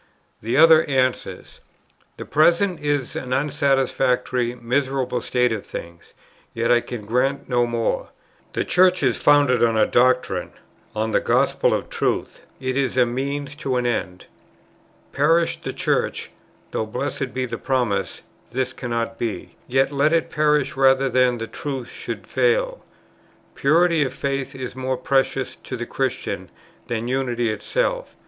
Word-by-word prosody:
The 115 +4 -1
other 160 0 +7
answers: 130 -2 -2 0.6
"The - - -7
present 170 +4 +3
is 145 -3 -1
an 125 -1 -3
unsatisfactory, 135 -3 +1
miserable 130 +1 -1
state 125 -1 +1
of 110 -3 -3
things, 85 0 -9 0.4
yet 115 +1 +1
I 120 0 +5
can 115 -4 -7
grant 130 +5 0
no 120 -1 +2
more. 115 -1 -1 0.4
The - - -1
Church 185 -2 +3
is 125 -4 +1
founded 145 -5 +4
on 115 -1 +3
a 110 - +5
doctrine, 125 +1 +1 0.4
on 110 +1 -1
the - - +3
gospel - - +2
of - - -1
Truth; - - -2
it 130 -1 -2
is 135 -2 0
a 125 - +5
means 140 +4 -3
to 135 -5 -2
an 125 -1 0
end. 95 -6 -2 0.9
Perish 165 +4 +2
the - - -4
Church, - - -1 0.4
(though, 110 - -2
blessed 135 +2 -3
be 130 0 -2
the 125 - -5
promise! 125 -6 -1 0.3
this 130 +1 -2
cannot 115 -2 -3
be,) 115 -4 -4
yet 135 +2 +2
let 145 +3 +2
it 165 - +1
perish 150 -2 +1
rather 135 0 +4
than 125 -1 +3
the 115 - -4
Truth 135 +1 -5
should - - -7
fail. - - 0 0.7
Purity 165 +2 +3
of 130 -1 -4
faith 140 0 -3
is 130 -1 -6
more 130 0 -2
precious 135 0 0
to 130 - -7
the 120 - -4
Christian 130 0 -3 0.4
than 115 0 -3
unity 120 -3 0
itself. - - -2
130 Hz, 150 wpm, -22 LUFS, 120-145 Hz, 0.9 s, other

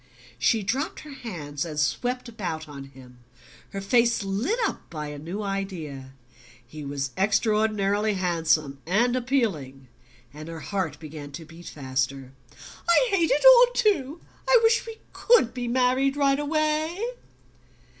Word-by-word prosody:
She 220 - +2
dropped 260 - -2
her 300 -2 -10
hands, 150 - -5
and 155 -3 -5
swept 245 +12 -1
about 175 -9 -5
on 140 -2 -9
him, 130 -2 -16 0.5
her 195 - -5
face 235 +2 +2
lit 205 - -1
up - - -4
by 150 -2 -5
a 145 -1 -7
new 175 +8 -5
idea. 170 -10 -5 0.5
He 150 +5 -9
was 140 -1 -3
extraordinarily 210 0 +1
handsome 160 -6 0
and 235 +7 +2
appealing, 190 - -1 0.4
and 155 +2 -9
her 165 -1 -7
heart 185 -8 -3
began 155 -2 -8
to 165 +3 -8
beat 165 +2 -13
faster. 135 -1 -3 0.6
"I 480 +8 +5
hate 345 -5 +2
it 295 - +2
all - - +8
too! 340 - +1 0.3
I - - +8
wish 455 +1 +3
we 450 -1 -7 0.2
COULD 450 - +3
be 245 -1 -4
married 255 +3 +2
right 275 -1 +3
away!" 310 +2 0
195 Hz, 145 wpm, -25 LUFS, -, 0.6 s, all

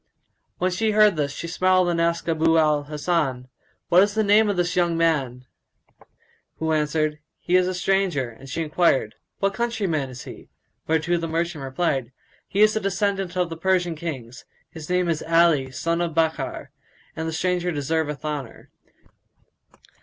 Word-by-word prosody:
'" - - -50
When 185 +1 0
she 215 +4 0
heard 210 -3 +5
this, 145 -2 -1
she 170 - -6
smiled 185 +1 +2
and 170 -1 0
asked 170 0 0
Abu 165 0 +2
al 150 -2 +2
Hasan, 145 -4 -1 0.4
"What 180 +1 +6
is 205 +1 +1
the 220 - +2
name 210 +1 +4
of 200 - -1
this 175 0 0
young 175 -2 +1
man?"; 135 -7 0 1.1
who 160 +1 -1
answered, 150 0 0 0.2
"He 180 - -1
is 185 0 +4
a 185 - -2
stranger;" 180 -7 0
and 125 +4 -13
she 165 - -2
enquired, 150 -8 +1 0.2
"What 195 0 0
countryman 195 - -1
is 125 -1 -9
he?"; - - -11 0.4
whereto 160 +2 +1
the 165 0 -3
merchant 165 -2 -2
replied, 135 -3 -1 0.4
"He 200 - 0
is 215 0 +5
a - - +1
descendant 195 -2 -1
of 180 -2 0
the 165 - -5
Persian 180 0 +1
Kings; 130 -7 -7 0.3
his 160 -1 -9
name 180 0 +1
is 165 -2 -1
Ali 165 -5 +3
son 170 +6 -2
of 170 -2 -2
Bakkar 160 -1 -1 0.4
and 160 0 -3
the - - -2
stranger 180 +2 -1
deserveth 150 -1 -2
honour." 145 -5 -6
165 Hz, 170 wpm, -23 LUFS, 150-180 Hz, 1.1 s, What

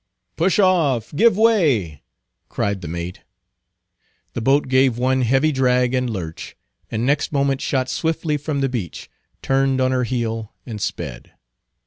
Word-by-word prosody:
"Push 180 +3 +1
off! 160 - +2
Give 225 +3 +4
way!" 145 - +2 0.5
cried 100 -2 -2
the 85 - -6
mate. 85 +2 -5 1.1
The 120 - -3
boat 135 +5 +2
gave 130 -2 +3
one 130 +1 +1
heavy 135 +6 +2
drag 125 -2 +2
and 125 -1 0
lurch, 85 -7 -6 0.3
and 115 +2 -2
next 140 +2 +1
moment 140 -2 0
shot 130 -2 0
swiftly 160 0 -1
from 145 -1 -3
the 135 - +2
beach, 115 - -6 0.3
turned 135 0 +1
on 130 0 +2
her 125 -1 +1
heel, 115 -3 -3
and 110 -4 -7
sped. 65 -12 -5
130 Hz, 145 wpm, -21 LUFS, 115-140 Hz, 1.1 s, Give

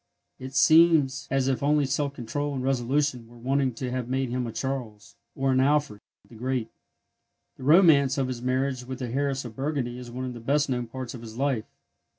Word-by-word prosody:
It 130 +1 -8
seems 155 -2 +5
as 135 -1 +1
if 135 -2 0
only 145 0 +3
self 140 +1 -1
control 140 +4 -3
and 130 - -3
resolution 130 -1 0
were 120 +1 -16
wanting 130 +1 0
to 125 +1 -4
have 125 -1 -3
made 130 0 -1
him 125 -1 -2
a - - -5
Charles, 125 -5 -5 0.2
or 135 0 +1
an 130 - +3
Alfred, 140 -5 +1 0.3
the - - -17
Great. 125 0 -3 0.9
The 130 - -10
romance 150 -4 +5
of 135 -2 0
his 125 -2 -5
marriage 130 0 -1
with 130 +1 -6
the 125 -2 -4
heiress 135 +1 -1
of 115 -2 -8
Burgundy 135 -3 -2
is 125 -1 -9
one 125 +2 -5
of 125 - -5
the 120 - -8
best 145 +5 +1
known 125 -1 -2
parts 130 +1 -6
of 120 - -8
his 115 -1 -10
life. 135 -5 0
130 Hz, 205 wpm, -26 LUFS, 125-140 Hz, 0.9 s, seems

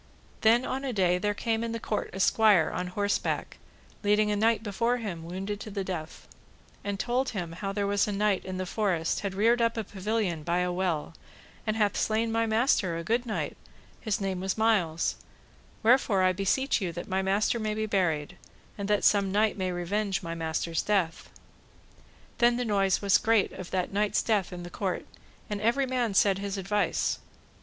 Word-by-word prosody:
Then 235 +2 +4
on 265 +1 -3
a 270 - -2
day 180 -3 +2
there 205 +2 0
came 225 +1 -1
in 230 -1 -3
the 230 - -3
court 215 - -2
a 190 - -7
squire 205 -4 +4
on 180 +1 -2
horseback, 200 +2 -2 0.4
leading 210 0 +3
a - - +1
knight 225 +1 +2
before 230 +4 0
him 190 -8 -5
wounded 190 +4 -4
to 215 - -7
the 200 -1 -3
death, 170 -4 -6 0.6
and 200 -1 -3
told 250 +4 0
him 175 -7 -4
how 195 +4 -4
there 200 0 -1
was 200 0 +1
a - - -1
knight 205 -1 +1
in 185 0 -5
the 185 - -2
forest 180 -5 0
had 200 -2 -4
reared 230 +4 +3
up 230 0 +1
a 225 - -1
pavilion 195 -4 -2
by 170 +3 0
a 180 0 +1
well, 175 -4 -1 0.5
and 215 - +1
hath 210 -2 +1
slain 225 +1 0
my 230 0 +1
master, 220 -6 +2
a 170 - -4
good 235 +6 0
knight, 215 - -3 0.4
his 215 -3 -1
name 190 -2 -2
was 190 +2 -2
Miles; 195 -8 +1 0.7
wherefore 225 -5 +4
I 185 - +5
beseech 210 +8 +1
you 180 -3 -1
that 175 - -6
my 190 0 0
master 200 +4 +1
may 215 -1 -2
be 220 0 -1
buried, 170 -8 0 0.4
and 200 - -2
that 210 0 +1
some 200 -2 +4
knight 210 +2 +2
may 185 -2 -2
revenge 190 +2 -1
my 165 0 -4
master's 165 0 -2
death. 190 -6 -1 1.1
Then 240 0 +4
the 250 - -1
noise 195 -3 +1
was 200 -1 +5
great 225 -4 +2
of 185 - -8
that 185 0 -2
knight's 205 +1 +1
death 210 -5 +1
in 175 -1 -7
the 175 - -8
court, 190 0 -3 0.4
and 205 -1 -4
every 240 +5 +2
man 245 -5 -1
said 195 -1 +4
his 200 0 -3
advice. 200 +2 0
200 Hz, 195 wpm, -28 LUFS, 185-220 Hz, 1.1 s, I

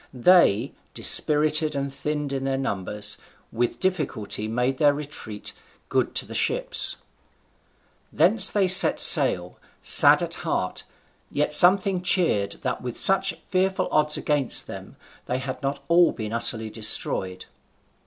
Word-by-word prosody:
They, 130 - +1 0.2
dispirited 150 0 +3
and 140 0 -5
thinned 150 0 -6
in 135 -1 -5
their 135 0 -3
numbers, 105 -4 -4 0.3
with 120 +1 -4
difficulty 150 - -4
made 125 +4 -4
their 145 -2 +2
retreat 140 -8 -8 0.4
good - - -3
to - - +1
the - - -12
ships. - - 0 1.2
Thence 190 +6 +2
they 200 -2 -1
set 185 0 +6
sail, 90 0 +5 0.2
sad - - +6
at - - -7
heart, - - -5 0.4
yet 150 +1 -3
something 185 +2 +4
cheered 170 - 0
that 125 -1 -5
with 125 -2 -8
such 195 0 +3
fearful 190 +1 -4
odds 150 0 +1
against 145 -4 -1
them - - -12 0.3
they 125 - -3
had 130 0 -8
not 140 0 -6
all 170 0 +2
been 110 -1 -8
utterly 115 -1 -4
destroyed. 95 -4 -2
140 Hz, 135 wpm, -22 LUFS, 115-170 Hz, 1.2 s, set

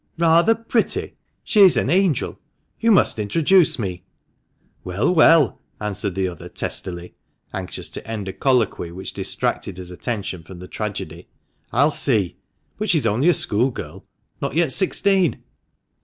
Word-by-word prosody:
" - - -44
Rather 170 +6 +4
pretty! 230 0 -1 0.3
She's 200 -5 +5
an - - +1
angel! 180 -6 +1 0.4
You 230 - +1
must 190 - +3
introduce 165 - +3
me 90 -6 -4 0.3
!" - - -47
" - - -40
Well, 95 - 0
well 160 -4 +5
!:' - - -42
answered 100 -2 -3
the 95 -1 0
other 85 -3 -8
testily, 90 -1 -4 0.4
anxious 95 -2 -5
to - - -8
end 110 -3 -5
a 95 - -4
colloquy 120 -10 0
which 95 +2 -7
distracted 95 - -2
his 90 -1 -7
attention 100 -2 -4
from 90 +3 -12
the 90 +1 -10
tragedy, 90 -6 -6 0.4
"I'll 145 +6 +3
see. 110 - +1 0.4
But 215 - -2
she's 155 -8 +2
only 115 +10 +2
a - - +5
schoolgirl 120 +5 -2 0.2
— - - -44
not - - -3
yet 165 -4 +2
sixteen 190 +1 +2
115 Hz, 155 wpm, -21 LUFS, -, 0.4 s, She's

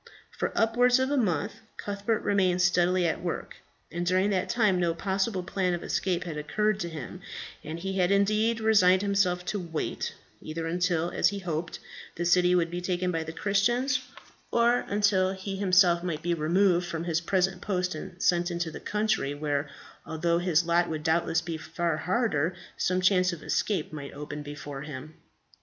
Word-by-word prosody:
For - - -2
upwards 245 +3 +4
of 260 +1 0
a - - +2
month 205 - 0 0.2
Cuthbert 205 +2 -2
remained 185 -3 +2
steadily 180 0 +3
at 165 - -1
work, 175 -1 -4 0.3
and 175 +1 -3
during 185 +3 +2
that 185 -2 0
time 215 -6 +2
no 170 -2 +1
possible 190 +1 -1
plan 180 0 0
of 175 - -7
escape 180 -2 -1
had 165 -3 -5
occurred 210 +7 0
to 170 -3 -3
him, 155 -6 -8 0.4
and 155 +2 -5
he 190 +2 -3
had 180 -1 +3
indeed 215 +3 +2
resigned 200 -4 +4
himself 190 -3 +1
to 205 +3 -2
wait, 165 -3 -4 0.3
either 165 +1 -5
until, 175 0 0
as - - +3
he 200 - -5
hoped, 170 -3 -4 0.4
the 175 - -2
city 180 +1 +4
would 170 -1 +1
be 175 +1 -3
taken 180 0 -1
by 165 -2 -1
the 160 - -6
Christians, 240 +9 +1 0.5
or 235 +1 +3
until 200 -2 +2
he 195 0 -5
himself 185 -3 +4
might 170 -3 -3
be 175 0 +1
removed 175 +2 +2
from 165 -1 -4
his 170 -1 0
present 185 +1 0
post 180 -2 -1
and 175 +3 -8
sent 175 0 +3
into 170 -1 -2
the - - -8
country, 210 -9 -1
where, 145 -1 -2 0.3
although 170 +1 0
his 175 -2 +2
lot 170 +1 +2
would 155 -1 -4
doubtless 165 0 +1
be 165 -1 -4
far 165 0 -2
harder, 180 -3 0 0.2
some 185 0 0
chance 185 -1 +4
of 170 -3 -8
escape 185 -8 -1
might 140 -2 -7
open 150 +1 -6
before 145 -1 -7
him. 150 +1 -8
180 Hz, 180 wpm, -28 LUFS, 165-200 Hz, 0.5 s, upwards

